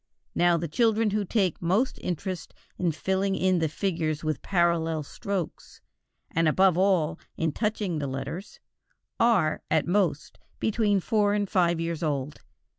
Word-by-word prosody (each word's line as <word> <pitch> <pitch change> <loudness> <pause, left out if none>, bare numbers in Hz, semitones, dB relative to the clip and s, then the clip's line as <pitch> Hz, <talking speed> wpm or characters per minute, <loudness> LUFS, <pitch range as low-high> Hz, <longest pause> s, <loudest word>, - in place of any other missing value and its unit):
Now 175 -1 +3
the 170 +1 -3
children 225 +4 +2
who 210 0 0
take 190 -3 0
most 195 +10 +1
interest 180 0 -4 0.2
in 175 -2 +1
filling 190 +5 0
in 185 -1 +2
the 160 -1 0
figures 160 -3 -2
with 155 -1 -2
parallel 170 -3 +1
strokes, 190 +4 -5 0.5
and, 165 0 +2
above 185 +3 +4
all, 180 -4 +2 0.2
in 160 -1 0
touching 210 -3 -1
the 140 - -2
letters, 135 +8 -6 0.6
are, 200 -10 +3
at 160 -1 +2
most, 175 -5 0 0.2
between 210 -3 +1
four 205 +1 +2
and 205 -1 0
five 170 -3 +2
years 165 -1 -3
old. 145 -3 -2
175 Hz, 145 wpm, -27 LUFS, 160-200 Hz, 0.6 s, above